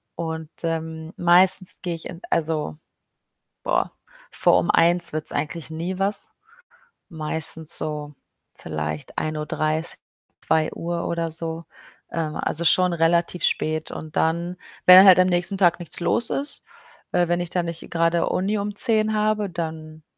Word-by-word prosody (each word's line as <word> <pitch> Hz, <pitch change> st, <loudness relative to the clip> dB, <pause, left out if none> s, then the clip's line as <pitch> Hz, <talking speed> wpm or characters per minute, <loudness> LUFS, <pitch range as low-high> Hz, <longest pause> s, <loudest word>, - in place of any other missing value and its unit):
Und, 160 Hz, -1 st, -5 dB
ähm, 160 Hz, -1 st, -4 dB
meistens 180 Hz, +2 st, +3 dB
gehe 175 Hz, -2 st, -3 dB
ich 165 Hz, -, -8 dB
in 170 Hz, -, -9 dB
also, 155 Hz, -2 st, -1 dB, 0.9 s
boah, -, -, 0 dB, 0.4 s
vor -, -, +3 dB
um -, -, 0 dB
01:00 170 Hz, 0 st, +3 dB
wird's 155 Hz, 0 st, -2 dB
eigentlich 160 Hz, +1 st, -4 dB
nie 170 Hz, +4 st, -4 dB
was. 195 Hz, +2 st, -2 dB, 0.8 s
Meistens 160 Hz, -1 st, -5 dB
so 150 Hz, -1 st, -5 dB, 0.4 s
vielleicht 75 Hz, -1 st, -5 dB
01:30, 155 Hz, +1 st, -2 dB, 0.5 s
02:00 170 Hz, +2 st, -1 dB
oder 165 Hz, -1 st, -2 dB
so, 165 Hz, +1 st, -4 dB, 0.5 s
ähm, 160 Hz, -2 st, -3 dB
also, 170 Hz, -, -1 dB
schon 180 Hz, +1 st, +4 dB
relativ 170 Hz, +1 st, +1 dB
spät. 155 Hz, 0 st, 0 dB
Und 155 Hz, -1 st, -8 dB
dann 170 Hz, +2 st, 0 dB, 0.3 s
wenn 180 Hz, 0 st, +10 dB
dann 190 Hz, +1 st, +9 dB
halt 185 Hz, -1 st, +8 dB
am 185 Hz, -, +5 dB
nächsten 175 Hz, +2 st, +1 dB
Tag 175 Hz, -2 st, +3 dB
nichts 175 Hz, -, -2 dB
los 180 Hz, +7 st, 0 dB
ist, 285 Hz, +2 st, -3 dB, 0.5 s
äh, 175 Hz, -1 st, +2 dB
wenn 175 Hz, +1 st, +1 dB
ich 175 Hz, -, -4 dB
da 180 Hz, 0 st, 0 dB
nicht 170 Hz, -1 st, -6 dB
grade 165 Hz, 0 st, +1 dB
Uni 200 Hz, +4 st, 0 dB
um 205 Hz, 0 st, -4 dB
10:00 220 Hz, -1 st, +2 dB
habe, 215 Hz, -1 st, +1 dB
dann 160 Hz, -2 st, -6 dB
170 Hz, 145 wpm, -23 LUFS, 160-180 Hz, 0.9 s, wenn